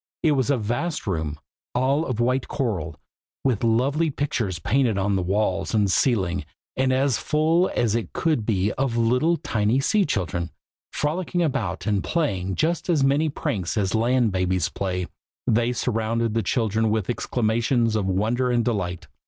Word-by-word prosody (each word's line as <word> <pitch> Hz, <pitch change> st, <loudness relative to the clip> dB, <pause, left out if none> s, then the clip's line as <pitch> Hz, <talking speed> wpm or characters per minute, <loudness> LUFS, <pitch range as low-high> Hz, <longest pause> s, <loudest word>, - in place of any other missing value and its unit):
It 160 Hz, -, +4 dB
was 135 Hz, -2 st, +1 dB
a 140 Hz, -, +3 dB
vast 120 Hz, +10 st, -2 dB
room, 80 Hz, -6 st, -2 dB, 0.4 s
all 135 Hz, +6 st, +1 dB
of 125 Hz, -3 st, -3 dB
white 125 Hz, +2 st, +1 dB
coral, 95 Hz, -, -2 dB, 0.5 s
with 125 Hz, -6 st, +1 dB
lovely 135 Hz, +8 st, +2 dB
pictures 125 Hz, -, -2 dB
painted 120 Hz, -, +1 dB
on 100 Hz, +1 st, +1 dB
the 95 Hz, -, +1 dB
walls 95 Hz, +2 st, 0 dB
and 100 Hz, -3 st, +2 dB
ceiling, 95 Hz, -, +1 dB, 0.3 s
and 130 Hz, 0 st, +1 dB
as 130 Hz, -1 st, +2 dB
full 160 Hz, +4 st, +2 dB
as 115 Hz, -4 st, +1 dB
it 115 Hz, -1 st, -2 dB
could 155 Hz, -8 st, 0 dB
be 105 Hz, -2 st, +1 dB
of 130 Hz, -3 st, 0 dB
little 125 Hz, +9 st, +2 dB
tiny 110 Hz, +1 st, 0 dB
sea 205 Hz, +9 st, +2 dB
children, 90 Hz, -, -2 dB, 0.4 s
frolicking 175 Hz, +3 st, -1 dB
about, 110 Hz, -, -2 dB
and 105 Hz, -3 st, +1 dB
playing 95 Hz, -, -1 dB
just 170 Hz, +3 st, 0 dB
as 155 Hz, -5 st, +3 dB
many 145 Hz, +4 st, +2 dB
pranks 100 Hz, -, -3 dB
as 95 Hz, -3 st, 0 dB
land 120 Hz, 0 st, +2 dB
babies 90 Hz, -2 st, 0 dB
play. 90 Hz, -2 st, -2 dB, 0.4 s
They 120 Hz, +2 st, +2 dB
surrounded 115 Hz, -1 st, -1 dB
the 115 Hz, -, +1 dB
children 110 Hz, 0 st, 0 dB
with 110 Hz, -3 st, 0 dB
exclamations 115 Hz, 0 st, 0 dB
of 105 Hz, -3 st, 0 dB
wonder 110 Hz, +7 st, +1 dB
and 120 Hz, -1 st, +1 dB
delight. 90 Hz, -7 st, -2 dB
115 Hz, 160 wpm, -24 LUFS, 100-135 Hz, 0.5 s, It